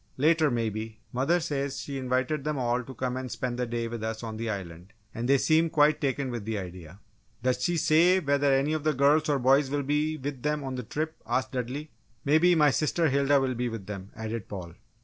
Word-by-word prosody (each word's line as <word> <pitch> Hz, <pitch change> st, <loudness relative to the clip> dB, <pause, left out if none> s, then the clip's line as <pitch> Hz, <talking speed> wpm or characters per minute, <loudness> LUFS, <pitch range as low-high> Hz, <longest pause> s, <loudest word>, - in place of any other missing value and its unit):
"Later, 155 Hz, +2 st, +4 dB
maybe. 110 Hz, -2 st, -3 dB
Mother 140 Hz, +8 st, +2 dB
says 140 Hz, -3 st, -2 dB
she 140 Hz, -1 st, -5 dB
invited 130 Hz, +3 st, -1 dB
them 150 Hz, 0 st, -2 dB
all 125 Hz, -1 st, 0 dB
to 130 Hz, +2 st, -10 dB
come 130 Hz, -1 st, -2 dB
and 130 Hz, -1 st, -4 dB
spend 125 Hz, -1 st, -3 dB
a 125 Hz, -, 0 dB
day 115 Hz, 0 st, -2 dB
with 115 Hz, -1 st, -6 dB
us 110 Hz, +1 st, -4 dB
on 110 Hz, -1 st, -5 dB
the 115 Hz, 0 st, -3 dB
Island, 90 Hz, -1 st, -6 dB, 0.2 s
and 120 Hz, +2 st, -3 dB
they 140 Hz, -, +6 dB
seemed 160 Hz, +3 st, +2 dB
quite 150 Hz, 0 st, +4 dB
taken 135 Hz, -2 st, -1 dB
with 120 Hz, -3 st, -4 dB
the 110 Hz, 0 st, -3 dB
idea." 90 Hz, -2 st, -8 dB, 0.4 s
"Does 125 Hz, 0 st, +1 dB
she 175 Hz, +3 st, +1 dB
say 170 Hz, +4 st, +4 dB
whether 140 Hz, -3 st, +2 dB
any 135 Hz, +3 st, +2 dB
of 155 Hz, -2 st, -2 dB
the 155 Hz, -1 st, +1 dB
girls 150 Hz, +4 st, +3 dB
or 145 Hz, -, +3 dB
boys 135 Hz, +2 st, +3 dB
will 145 Hz, 0 st, -1 dB
be 150 Hz, +3 st, 0 dB
with 140 Hz, -2 st, -5 dB
them 150 Hz, +1 st, -1 dB
on 135 Hz, -1 st, -4 dB
the 125 Hz, -, -3 dB
trip?" 155 Hz, +7 st, -4 dB
asked 130 Hz, -, 0 dB
Dudley. 130 Hz, +4 st, -4 dB, 0.3 s
"Maybe 160 Hz, +5 st, +5 dB
my 150 Hz, -3 st, +5 dB
sister 160 Hz, +3 st, +1 dB
Hilda 140 Hz, +1 st, +3 dB
will 130 Hz, -1 st, 0 dB
be 125 Hz, 0 st, -2 dB
with 115 Hz, -4 st, -6 dB
them!" 100 Hz, -1 st, -7 dB
added 110 Hz, -1 st, -5 dB
Paul. 90 Hz, -4 st, -7 dB
135 Hz, 225 wpm, -28 LUFS, 115-150 Hz, 0.4 s, they